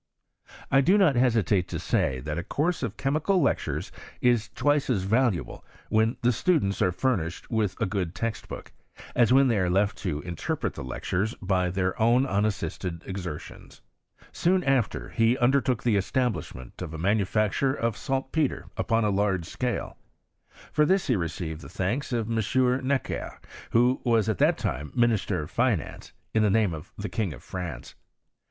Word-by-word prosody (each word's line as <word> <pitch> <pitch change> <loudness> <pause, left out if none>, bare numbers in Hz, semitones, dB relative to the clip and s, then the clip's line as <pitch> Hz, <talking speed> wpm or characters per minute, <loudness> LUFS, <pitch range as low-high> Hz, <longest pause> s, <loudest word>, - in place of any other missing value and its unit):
I 135 0 +6
do 185 +9 +4
not 180 -9 +4
hesitate 110 -7 +2
to - - -4
say, 65 -2 0
that 75 +4 -3
a - - -4
course 160 - -1
of 120 -6 -3
chemical 155 +8 +1
lectures 140 - -1 0.3
is 120 -3 +2
twice 145 -1 +2
as 105 -7 +1
valuable 110 -1 0 0.3
when 110 +2 +2
the 120 - +4
students 115 - +1
are 90 - +3
furnished 90 -5 -2
with 110 -4 0
a 115 - +1
good 95 -4 -2
text 115 -1 -3
book, - - -8 0.4
as 120 -1 +3
when 135 +1 +6
they 115 -5 +2
are 90 -1 +1
left 100 +3 +1
to 80 -7 -2
interpret 85 -1 -3
the - - -7
lec» 65 - -6
twes 105 +6 0
by 90 -2 +1
their 95 +2 -1
own 120 +4 +4
unassisted 95 - -2
exertions. 90 -5 -7 0.5
Soon 180 +1 +2
after 135 -5 0
he 115 +2 +2
undertook 125 -2 +2
the 115 -4 +3
establishment 100 - -2
of 80 -3 -5
a - - -5
manufacture 105 - +1
of 115 -4 -1
saltpetre 135 +4 -2
upon 115 -1 +1
a 105 - +2
large 95 -3 +1
scale. 125 +7 -3 0.7
For 150 - +3
this 190 +4 +2
he 125 - +2
received 85 -3 -4
the - - -10
thanks 115 +11 -2
of 115 -3 -1
M. 125 +3 +1
Necker, 140 -1 -2 0.3
who 125 +3 +3
was 115 -4 +2
at 110 -5 -1
that - - +4
time 75 +4 -3
minister 110 -8 +1
of 75 - -10
finance, 115 - -1 0.2
in 110 - +3
the 105 - +4
name 105 -3 +2
of 80 +3 -8
the 105 - -4
King 105 -8 -2
of - - -13
France. 85 -10 -6
110 Hz, 170 wpm, -27 LUFS, 90-125 Hz, 0.7 s, I